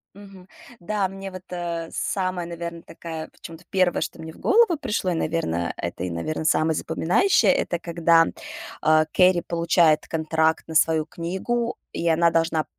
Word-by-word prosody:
Мгм, 195 Hz, -2 st, -14 dB, 0.3 s
да, 195 Hz, +2 st, -1 dB
мне 195 Hz, 0 st, -8 dB
вот 185 Hz, 0 st, -8 dB
э, 170 Hz, -2 st, -4 dB
самое, 185 Hz, -2 st, -2 dB
наверное, 170 Hz, 0 st, -6 dB
такое 165 Hz, -2 st, -8 dB
в -, -, -26 dB
чём-то 165 Hz, +1 st, -11 dB
1, 185 Hz, -2 st, +1 dB
что -, -, -4 dB
мне 160 Hz, 0 st, -8 dB
в -, -, -18 dB
голову 425 Hz, -5 st, +4 dB
пришло, 200 Hz, -8 st, -1 dB
и, -, -, 0 dB
наверно, 120 Hz, -, -1 dB
это 85 Hz, +1 st, -4 dB
и, 90 Hz, -, -3 dB
наверно, 155 Hz, -, -3 dB
самое 160 Hz, 0 st, +2 dB
запоминающее, 175 Hz, -, +2 dB
это 175 Hz, -1 st, -1 dB
когда, 170 Hz, -1 st, +3 dB, 0.6 s
а, 155 Hz, 0 st, +4 dB
Кэрри 180 Hz, +2 st, +4 dB
получает 170 Hz, -2 st, +2 dB
контракт 160 Hz, 0 st, 0 dB
на 160 Hz, -, -6 dB
свою 160 Hz, 0 st, +3 dB
книгу, 190 Hz, +9 st, -3 dB, 0.2 s
и -, -, -4 dB
и -, -, +2 dB
она 165 Hz, +1 st, +4 dB
должна 165 Hz, -1 st, +1 dB
170 Hz, 170 wpm, -24 LUFS, 160-185 Hz, 0.6 s, голову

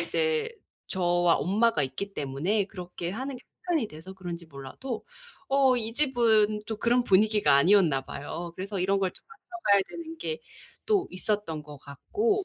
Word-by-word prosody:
이제 470 Hz, -2 st, 0 dB, 0.4 s
저와 175 Hz, -2 st, +2 dB
엄마가 210 Hz, -2 st, +2 dB
있기 170 Hz, +10 st, -4 dB
때문에 150 Hz, +10 st, 0 dB
그렇게 180 Hz, -2 st, -6 dB
하는 260 Hz, +7 st, -4 dB
게 250 Hz, -, -14 dB
습관이 325 Hz, -, -2 dB
돼서 160 Hz, +3 st, -10 dB
그런지 175 Hz, -3 st, -7 dB
몰라도 160 Hz, -, -7 dB, 0.4 s
어 270 Hz, -2 st, +4 dB
이 225 Hz, -1 st, -1 dB
집은 225 Hz, -6 st, +3 dB
또 220 Hz, -, -3 dB
그런 240 Hz, +3 st, +3 dB
분위기가 210 Hz, -3 st, +4 dB
아니었나 160 Hz, -2 st, +5 dB
봐요. 170 Hz, +6 st, -6 dB
그래서 195 Hz, +2 st, -4 dB
이런 195 Hz, +2 st, +2 dB
걸 190 Hz, -1 st, +1 dB
좀 -, -, -15 dB
맞춰 455 Hz, -, -17 dB, 0.3 s
봐야 200 Hz, -, +7 dB
되는 330 Hz, -1 st, -8 dB
게 470 Hz, +7 st, -4 dB, 0.5 s
또 410 Hz, -4 st, +2 dB
있었던 185 Hz, -5 st, -2 dB
것 145 Hz, -1 st, -11 dB
같고 400 Hz, -, -1 dB
205 Hz, 325 characters per minute, -28 LUFS, 175-250 Hz, 0.5 s, 봐야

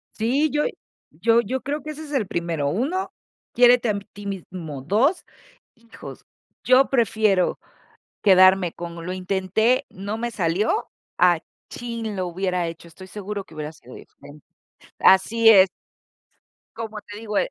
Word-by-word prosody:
Sí, 265 Hz, +8 st, +1 dB
yo 295 Hz, 0 st, +1 dB, 0.5 s
yo 230 Hz, 0 st, +2 dB
yo 250 Hz, +4 st, -4 dB
creo 285 Hz, +4 st, -3 dB
que 305 Hz, -, -9 dB
ese 305 Hz, +1 st, -8 dB
es 295 Hz, -, -10 dB
el 260 Hz, -9 st, 0 dB
primero, 170 Hz, -5 st, -2 dB
1, 285 Hz, -, -2 dB, 0.4 s
quiérete 245 Hz, -1 st, +5 dB
a 205 Hz, -, 0 dB, 0.2 s
ti 205 Hz, 0 st, -9 dB
mismo, 175 Hz, -7 st, -7 dB
2, 235 Hz, -, +1 dB, 0.5 s
hijos, 230 Hz, -1 st, -12 dB, 0.4 s
yo 255 Hz, +2 st, +4 dB
prefiero 220 Hz, -6 st, +1 dB, 0.6 s
quedarme 185 Hz, -2 st, +5 dB
con 170 Hz, -1 st, -8 dB
"Lo -, -, -3 dB
intenté, 190 Hz, +6 st, 0 dB
no 200 Hz, +3 st, -6 dB
me 240 Hz, +1 st, -2 dB
salió", 190 Hz, -, 0 dB, 0.3 s
a 175 Hz, -2 st, +5 dB, 0.3 s
"¡Chin! 230 Hz, -3 st, -5 dB
lo 185 Hz, -1 st, -2 dB
hubiera 180 Hz, -1 st, -2 dB
hecho, 165 Hz, +1 st, -9 dB
estoy 185 Hz, +3 st, -13 dB
seguro 200 Hz, +1 st, -6 dB
que 160 Hz, -, -17 dB
hubiera 150 Hz, 0 st, -5 dB
sido 125 Hz, -5 st, -15 dB
diferente", 145 Hz, 0 st, -15 dB, 0.6 s
así 225 Hz, +4 st, +5 dB
es. 195 Hz, -3 st, +7 dB, 1.1 s
Como 220 Hz, -2 st, -6 dB
te 205 Hz, -, -11 dB
digo, 215 Hz, -2 st, -4 dB
eh -, -, +3 dB
205 Hz, 145 wpm, -23 LUFS, 180-235 Hz, 1.1 s, es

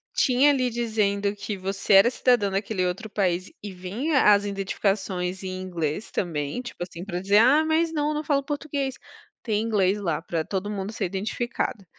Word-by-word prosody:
Tinha 265 Hz, +2 st, +4 dB
ali 255 Hz, -3 st, +2 dB
dizendo 210 Hz, -3 st, 0 dB
que 205 Hz, +1 st, -5 dB
você 195 Hz, +1 st, -1 dB
era 195 Hz, +5 st, +8 dB
cidadão 245 Hz, -6 st, +2 dB
daquele 195 Hz, 0 st, -1 dB
outro 180 Hz, +4 st, -2 dB
país 185 Hz, -3 st, -1 dB
e 205 Hz, -, -5 dB
vinha 220 Hz, -, 0 dB
as 205 Hz, 0 st, +3 dB
identificações 195 Hz, -2 st, -2 dB
em 185 Hz, 0 st, -4 dB
inglês, 175 Hz, 0 st, -3 dB
também 155 Hz, +3 st, -2 dB
tipo 245 Hz, -7 st, -10 dB
assim, 175 Hz, 0 st, -8 dB
pra 180 Hz, -2 st, -4 dB
dizer: 200 Hz, +2 st, +3 dB
"Ah, 270 Hz, +8 st, +6 dB
mas 320 Hz, +1 st, +1 dB
não, 295 Hz, 0 st, 0 dB
não 300 Hz, 0 st, -2 dB
falo 285 Hz, -2 st, +1 dB
português.". 285 Hz, -2 st, -3 dB, 0.5 s
Tem 215 Hz, -3 st, 0 dB
em 225 Hz, -, -2 dB
inglês 205 Hz, -2 st, +2 dB
lá 170 Hz, -6 st, -1 dB
pra 165 Hz, -1 st, -3 dB
todo 195 Hz, +3 st, -3 dB
mundo 200 Hz, -1 st, -4 dB
ser -, -, -2 dB
identificado. 205 Hz, +2 st, -3 dB
205 Hz, 180 wpm, -25 LUFS, 185-245 Hz, 0.5 s, era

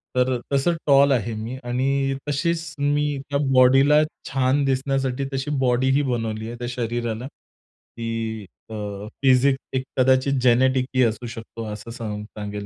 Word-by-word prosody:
तर 125 Hz, 0 st, +2 dB
तसं 140 Hz, +5 st, +2 dB
टॉल 140 Hz, 0 st, +6 dB
आहे 115 Hz, -3 st, 0 dB
मी 115 Hz, +4 st, -5 dB
आणि 135 Hz, +2 st, 0 dB
तशीच 165 Hz, +3 st, -1 dB
मी 145 Hz, 0 st, +1 dB
त्या 140 Hz, 0 st, 0 dB
बॉडीला 135 Hz, +4 st, +6 dB, 0.3 s
छान 135 Hz, +2 st, +1 dB
दिसण्यासाठी 135 Hz, 0 st, 0 dB
तशी 135 Hz, +2 st, -2 dB
बॉडीही 130 Hz, +2 st, +2 dB
बनवली 115 Hz, -4 st, -2 dB
आहे, 120 Hz, -, -6 dB
त्या 120 Hz, -, -4 dB
शरीराला, 120 Hz, 0 st, -3 dB
की 115 Hz, -5 st, -7 dB, 0.2 s
अ, -, -, -8 dB, 0.5 s
फिसिक 130 Hz, +1 st, +5 dB, 0.2 s
एक 130 Hz, 0 st, 0 dB
कदाचित 130 Hz, +1 st, +3 dB
जेनेटिक 130 Hz, +1 st, +3 dB
ही 130 Hz, -, +5 dB
असू 115 Hz, +1 st, -1 dB
शकतो 115 Hz, 0 st, -8 dB
असं 105 Hz, +2 st, -8 dB
सांग 110 Hz, -3 st, -5 dB
सांगेल 105 Hz, -1 st, -7 dB
130 Hz, 140 wpm, -23 LUFS, 115-135 Hz, 0.5 s, टॉल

